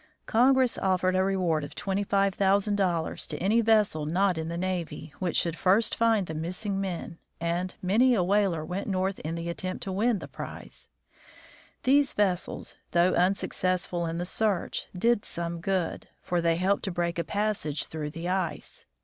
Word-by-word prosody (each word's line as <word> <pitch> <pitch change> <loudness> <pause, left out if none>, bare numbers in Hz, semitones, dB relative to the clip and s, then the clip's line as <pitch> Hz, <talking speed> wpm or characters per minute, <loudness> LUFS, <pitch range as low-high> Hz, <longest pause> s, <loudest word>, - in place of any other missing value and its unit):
Congress 255 +2 +3
offered 185 -1 +1
a 185 - +3
reward 180 -5 +1
of 145 - -8
$25,000 195 -2 +1
to - - -4
any 210 +6 +3
vessel 210 -9 +2
not 185 +3 +2
in 160 0 -3
the 170 +1 -4
navy, 175 -4 -3
which 180 -3 0
should 170 -2 +1
first 195 +6 +3
find 225 -4 +2
the 160 - -6
missing 185 +5 -2
men, 175 -3 -5 0.2
and 170 +2 -2
many 235 +7 +4
a 185 - +2
whaler 190 -4 +1
went 185 +4 -4
north 190 -1 -1
in 160 +2 -4
the 170 0 -4
attempt 185 +2 -4
to 195 - -4
win 215 +4 +2
the - - -8
prize. - - -8 0.9
These 275 +1 +4
vessels, 190 -4 -1 0.2
though 175 +1 +4
unsuccessful 180 -1 0
in 165 +1 -3
the 175 - -2
search, 205 0 -1
did 230 +2 +2
some 170 0 -1
good, 185 -2 -1 0.2
for 175 -1 0
they 165 0 +2
helped 190 +3 +1
to 190 - -2
break 170 -1 -1
a - - +1
passage 200 -9 -1
through 155 -2 -5
the 165 +3 -6
ice. 185 -2 -3
185 Hz, 165 wpm, -28 LUFS, 170-200 Hz, 0.9 s, many